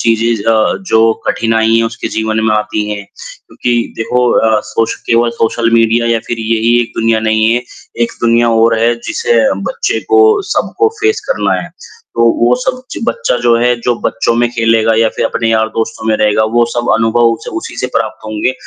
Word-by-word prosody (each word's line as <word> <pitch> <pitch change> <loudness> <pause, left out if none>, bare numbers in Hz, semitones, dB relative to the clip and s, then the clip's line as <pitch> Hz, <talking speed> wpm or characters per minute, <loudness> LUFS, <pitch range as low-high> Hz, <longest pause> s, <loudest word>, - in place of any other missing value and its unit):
चीज़ें 115 -1 0
अ, 110 -1 +1
जो 110 0 +4
कठिनाइयाँ 115 0 +1
उसके 115 0 -5
जीवन 110 0 -1
में 110 -1 +2
आती 105 0 -2
हैं। 100 -1 -5
क्योंकि 120 -1 -5 0.2
देखो 125 +2 0
अ, 110 -1 +2
सोश 115 - 0
केवल 115 0 +2
सोशल 115 +1 0
मीडिया 115 +1 +2
या 115 - +1
फ़िर 120 - -3
यही 115 +1 +1
एक 120 - -4
दुनिया 115 -1 +1
नहीं 110 +1 +2
है, 120 +1 0 0.4
एक 115 - -1
दुनिया 115 0 +3
और 115 -1 +3
है 120 +1 +2
जिसे 470 +1 0 0.3
बच्चे 475 -1 -2
को 420 - +5 0.3
सबको 435 - 0
फेस 430 +1 +1
करना - - 0
है, - - -9 0.5
तो 115 - +2 0.2
वो 120 +1 +4
सब 255 - -3
ज - - -5
बच्चा 475 - -1
जो 120 - +3
है, 120 +1 +2
जो 120 +1 0
बच्चों 115 - 0
में 120 0 +1
खेलेगा 115 -1 +2
या 115 - +3
फ़िर - - -1
अपने 115 - -2
यार 110 0 +1
दोस्तों 110 0 -4
में 110 - +2
रहेगा 105 0 +2
वो 120 0 +4
सब 120 0 -2
अनुभव 115 +1 +2
उसे 115 - -9
उसी - - -6
से - - -1
प्राप्त - - -3
होंगे। 110 +4 -1
115 Hz, 195 wpm, -13 LUFS, 110-120 Hz, 0.5 s, को